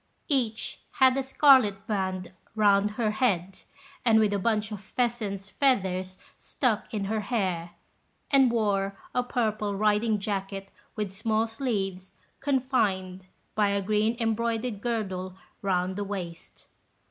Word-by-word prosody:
Each 240 -6 -1
had 260 -1 +5
a 270 - +1
scarlet 260 -7 +4
band 190 -3 -2 0.2
round 205 -1 +4
her 215 0 -1
head, 195 -5 0 0.4
with 220 -3 +4
a 200 - +1
bunch 215 +1 0
of 205 -2 -6
pheasant's 205 -3 -2
feathers 190 -8 +1 0.2
stuck 240 -6 -1
in 205 -3 -2
her 215 +2 -1
hair, 190 -6 -2 0.6
and 270 -3 +6
wore 200 -4 0 0.2
a 250 - +2
purple 215 -4 -1
riding 215 +2 +2
jacket 195 -1 -4 0.3
with 210 -3 -2
small 220 +2 0
sleeves, 200 -6 -3 0.3
confined 205 -10 0 0.3
by 210 -1 +2
a 200 0 +1
green 215 +3 +1
embroidered 230 -1 -1
girdle 190 -6 -3 0.3
round 185 -1 0
the 205 - -1
waist. 180 -5 -7
210 Hz, 125 wpm, -27 LUFS, 195-230 Hz, 0.6 s, and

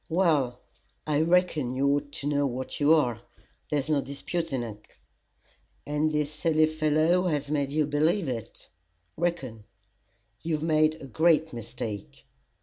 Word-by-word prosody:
"Well, 150 -8 +1 0.4
I 150 -1 +1
reckon 160 -6 +2
you 135 +2 +1
ought 145 0 0
to 140 - -4
know 145 -1 +1
what 130 +1 -5
you 145 +1 +4
are. 120 -7 0 0.5
There's 145 -2 0
no 150 -2 +2
disputing 140 -1 -3
it." 105 -2 -8 1.0
"And 150 +1 0
this 150 -1 -1
silly 155 0 +2
fellow 155 +3 +2
has 145 -3 -1
made 140 -2 0
you 150 +1 +1
believe 155 +5 +1
it?" 115 -5 -6 0.5
"Reckon!" 135 -11 -2 0.8
"You've 160 -2 -2
made 155 -1 +3
a 160 - -11
great 160 +4 +2
mistake." 110 -3 -6
150 Hz, 140 wpm, -27 LUFS, 135-160 Hz, 1.0 s, you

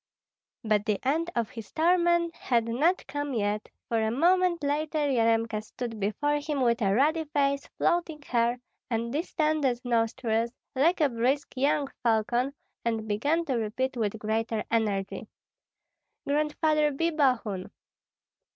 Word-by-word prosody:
But 210 -2 +1
the 210 -2 +1
end 320 +6 +1
of 230 -2 -1
his 225 -3 -9
torment 345 0 +2
had 235 -7 +1
not 300 +11 +1
come 290 -1 -3
yet, 210 0 -1 0.2
for 230 -1 +1
a 220 - +1
moment 345 +6 +2
later 300 +2 -1
Yaremka 225 -4 +2
stood 225 0 -6
before 290 +9 0
him 290 -1 -2
with 235 -1 +2
a 195 -2 +2
ruddy 315 +6 +2
face, 280 -1 0
floating 340 -3 +1
hair, 240 -2 +1 0.3
and 235 0 -2
distended 305 -5 0
nostrils, 230 -1 0 0.2
like 320 +7 +2
a 295 - +4
brisk 255 +4 0
young 280 +2 +1
falcon, 240 +3 +1 0.3
and 225 -2 -1
began 290 +11 +1
to 275 - -1
repeat 245 +4 -2
with 220 -2 -1
greater 220 +1 -1
energy, 205 -4 -1 1.0
"Grandfather, 300 +1 +2
be 330 +4 0
Bogun!" 245 - 0
260 Hz, 135 wpm, -28 LUFS, 225-300 Hz, 1.0 s, a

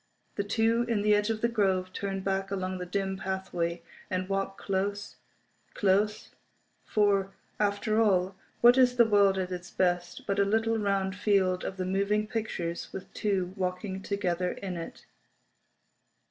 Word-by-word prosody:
The 200 - -2
two 225 +3 +2
in 210 -3 +1
the 210 0 +4
edge 210 +1 +2
of 220 -1 -1
the 235 - +3
grove 190 -5 0
turn 195 -1 -3
back 195 0 -1
along 185 -1 -3
the 180 - -5
dim 190 +1 -2
pathway, 175 -3 -3 0.3
and 185 0 -2
walk 195 0 -2
close, 200 +1 -2 0.6
close—for, 205 0 0 0.3
after 210 +2 +1
all, 190 -3 +2 0.3
what 245 +2 +7
is 250 -1 +5
the 235 -1 +6
world 200 -3 +4
at 185 -1 -2
its 180 0 -6
best 175 -1 -1
but 200 0 -1
a - - +6
little 225 +2 +1
round 195 -2 0
field 190 -3 +2
of 195 - -4
the 185 - -2
moving 200 +3 +1
pictures 215 -6 -4
with 190 - -8
two 190 -3 -1
walking 190 0 -3
together 185 -3 -1
in 190 -2 -5
it? 165 -1 -8
195 Hz, 155 wpm, -29 LUFS, 185-210 Hz, 0.6 s, what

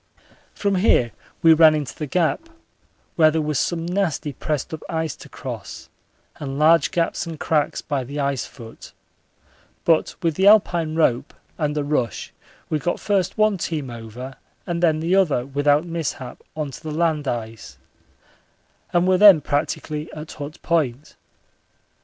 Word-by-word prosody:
From 200 -2 0
here 125 - +3 0.3
we 165 -1 +8
ran 160 -1 +6
into 150 -3 -4
the 150 - -5
Gap, 180 - 0 0.7
where 155 -2 +6
there 160 +1 0
was 150 -3 -1
some 170 -1 -1
nasty 170 -5 -1
pressed 150 +3 -3
up 160 - -5
ice 160 -3 -2
to - - -13
cross - - -8 0.5
and 140 -2 -5
large 160 +3 +5
gaps 170 0 -1
and 160 -2 -7
cracks 150 -3 0
by 140 -4 -2
the 140 +4 -6
ice 140 -2 -1
foot; 115 -3 -12 0.9
but 165 -2 +2
with 165 -2 +2
the 190 +6 +2
Alpine 175 -6 +4
rope 135 -4 +1 0.2
and 150 -1 -1
a 145 - 0
rush 140 -6 -2 0.3
we 155 - -1
got 175 +5 -2
first 200 -1 0
one 215 -3 +2
team 150 -7 -3
over 120 +3 -8 0.3
and 170 -1 -3
then 160 -3 +2
the 170 +3 +1
other 155 -11 +2
without 145 +3 +2
mishap 160 -7 -5
on 150 -3 -3
to - - -10
the 155 - -6
land 155 -2 0
ice, 110 - -5 1.1
and 175 +1 +2
were 185 -1 +3
then 200 -5 +9
practically 150 +1 -3
at 155 0 -8
Hut 145 +2 -8
Point. 150 -4 -1
155 Hz, 160 wpm, -22 LUFS, 140-170 Hz, 1.1 s, then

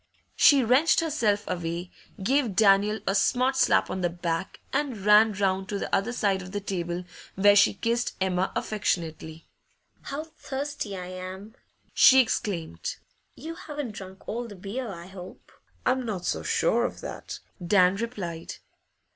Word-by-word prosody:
She 280 -3 +6
wrenched 260 +8 +4
herself 235 -11 +1
away, 175 +1 -4 0.3
gave 250 -3 +1
Daniel 205 +1 +4
a 195 - +1
smart 250 +6 +2
slap - - +3
on 190 - -4
the 175 - +1
back, 170 0 -3
and 275 -4 -1
ran 210 +1 +6
round 190 -1 0
to 205 - -2
the - - -5
other 200 +5 +1
side 200 -5 0
of 180 0 -9
the 205 - -2
table, 180 -3 -3 0.3
where 205 +1 +5
she 200 0 +5
kissed 235 +5 -1
Emma 185 0 0
affectionately. 165 -6 -3 0.6
'How 280 +3 -5
thirsty 285 -8 -5
I 180 - -6
am!' 185 +3 -8 0.4
she 265 0 +7
exclaimed. 175 - -1 0.4
'You 320 +4 -7
haven't 295 -6 -6
drunk 190 -2 -11
all 235 +2 -3
the 205 - -10
beer, 205 +7 -5
I 170 -2 -9
hope.' 185 -1 -12 0.3
'I'm 255 0 +2
not 200 -7 -4
so - - -1
sure - - +1
of - - -3
that,' - - -7 0.3
Dan 180 +1 +4
replied. 195 -8 -5
200 Hz, 155 wpm, -26 LUFS, 185-245 Hz, 0.6 s, she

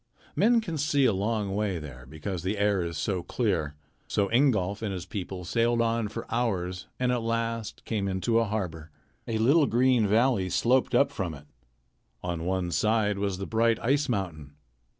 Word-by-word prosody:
Men 230 +3 +4
can 170 -8 -4
see 145 -1 +2
a 115 - +4
long 105 0 -1
way 100 -3 -1
there 65 -5 -9
because 85 +4 -5
the 95 +4 -2
air 100 -2 +2
is 85 -2 -3
so 90 +3 -1
clear. 85 - -1 0.3
So 100 -2 0
Ingolf 110 -6 +2
and 110 -3 -2
his 90 -2 -5
people 95 -2 -6
sailed 115 +5 +1
on 115 -1 +1
for 115 +2 -6
hours 90 -6 -1
and 125 0 +2
at 125 -1 0
last 115 -1 -3
came 105 -3 -1
into 100 +5 +1
a 115 - +2
harbor. 90 -7 -4 0.4
A 115 - -1
little 140 +7 +4
green 125 -2 +3
valley 110 -2 +2
sloped 125 +8 +2
up 140 0 +4
from 90 - -3
it. 70 +1 -13 0.8
On 85 -2 -3
one 90 -1 -1
side 105 0 +1
was 100 -2 -1
the 95 - -4
bright 115 +1 +2
ice 140 +3 +1
mountain. 80 - -3
105 Hz, 180 wpm, -27 LUFS, 90-115 Hz, 0.8 s, Men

